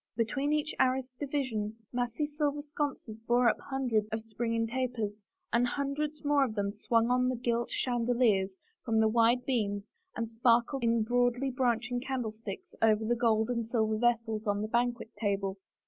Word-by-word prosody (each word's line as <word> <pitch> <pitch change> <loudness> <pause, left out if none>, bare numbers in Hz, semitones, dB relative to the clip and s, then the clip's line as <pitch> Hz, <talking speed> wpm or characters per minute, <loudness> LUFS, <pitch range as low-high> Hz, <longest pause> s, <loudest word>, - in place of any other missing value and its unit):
Be 230 - +3
tween 275 +6 -1
each 300 0 0
arras 260 0 +2
division 255 -7 -2 0.2
massy 245 +4 -1
silver 295 -1 -1
sconces 285 -7 -4
bore 240 +2 +3
up - - +2
hundreds 245 -6 0
of 220 0 -2
springing 230 +1 -1
tapers, 235 -3 -2 0.4
and 240 +1 +3
hundreds 290 +3 -3
more 290 -1 +4
of 230 -5 -2
them 200 -1 0
swung 230 +2 +1
on 250 0 +3
gilt 235 0 0
chandeliers 235 -6 +1 0.3
from 225 -2 +1
the 220 - +5
wide 235 +2 +3
beams 205 -6 0 0.3
and 230 0 -2
sparkled 235 +3 +2
in 230 -1 +3
broadly 245 +3 +1
branching 245 -1 0
candlesticks 225 -6 -5
over 220 0 +4
the 240 +2 +2
gold 225 -1 +2
and 235 -2 -2
silver 220 -2 +1
vessels 230 -2 +1
on 205 0 +1
the - - -2
banquet 240 0 -1
table. 200 -2 -1
235 Hz, 160 wpm, -31 LUFS, 220-255 Hz, 0.4 s, the